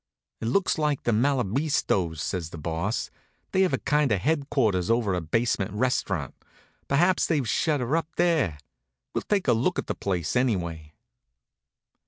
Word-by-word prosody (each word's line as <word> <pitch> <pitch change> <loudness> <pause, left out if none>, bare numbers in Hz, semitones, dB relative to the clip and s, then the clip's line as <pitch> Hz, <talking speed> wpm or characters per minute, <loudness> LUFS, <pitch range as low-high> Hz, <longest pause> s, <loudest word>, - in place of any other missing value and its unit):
"It 110 - -3
looks 185 +5 +1
like 150 -2 0
the 120 - +1
Malabistos," 115 - +1
says 90 -4 -3
the 85 - -9
Boss. 85 +7 -2 0.4
"They 190 - +2
have 185 - +3
a - - +1
kind 150 -3 +1
of 100 -3 +1
headquarters 130 - +1
over 115 -4 +2
a 90 - -1
basement 100 +3 0
restaurant. 105 - -1 0.5
Perhaps 175 +6 +3
they've 145 -7 0
shut 145 +6 +1
her 125 +5 0
up 165 -1 0
there. 165 - +2 0.6
We'll - - -1
take 205 -3 0
a - - +5
look 125 +11 0
at - - -1
the - - -2
place 90 -3 -2
anyway." 85 -11 -1
115 Hz, 160 wpm, -26 LUFS, 90-150 Hz, 0.6 s, a